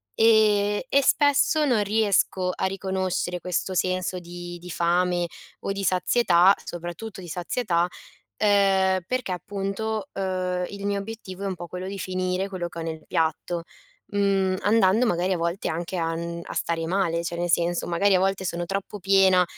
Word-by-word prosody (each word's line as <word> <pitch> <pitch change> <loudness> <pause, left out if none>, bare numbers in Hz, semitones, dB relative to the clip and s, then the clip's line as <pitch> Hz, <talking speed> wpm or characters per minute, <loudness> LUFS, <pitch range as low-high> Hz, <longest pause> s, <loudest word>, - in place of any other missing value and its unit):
E 210 -1 +4
e 280 0 +4
spesso 290 +2 +3
non 240 -7 +2
riesco 200 -3 +1
a - - -1
riconoscere 190 -2 -2
questo 180 +1 -2
senso 185 0 0
di 175 0 -8
di 180 - -10
fame, 175 +1 +1 0.3
o 195 - -2
di 195 0 -4
sazietà, 185 0 +4
soprattutto 175 +4 -7
di 175 - -9
sazietà, 175 +1 0 0.6
uhm, 195 -2 +3
perché, 250 -5 -2
appunto, 200 - -3
uhm, 185 -1 -1
il 200 0 -6
mio 200 0 0
obiettivo 200 -2 -8
è - - -1
un 195 - -2
po' 175 - -7
quello 180 +1 -6
di 200 - -5
finire 185 0 -2
quello 185 -3 -4
che 170 - -10
ho - - -3
nel 160 -1 -5
piatto, 165 +1 -1 0.5
mhmm, 195 -2 +2
andando, 215 +2 +4
magari, 180 0 +1
a - - -3
volte 170 +3 -1
anche 170 +3 -3
a 165 -1 -1
n 170 +1 -4
a - - -7
stare 165 -1 -1
male 170 -2 0
cioè, 170 0 -3
nel 175 0 -1
senso 170 +1 +1
magari 195 +4 +3
a 185 - +5
volte 195 0 0
sono 175 -1 -2
troppo 195 +2 -4
piena 190 -1 +5
185 Hz, 170 wpm, -25 LUFS, 175-200 Hz, 0.6 s, a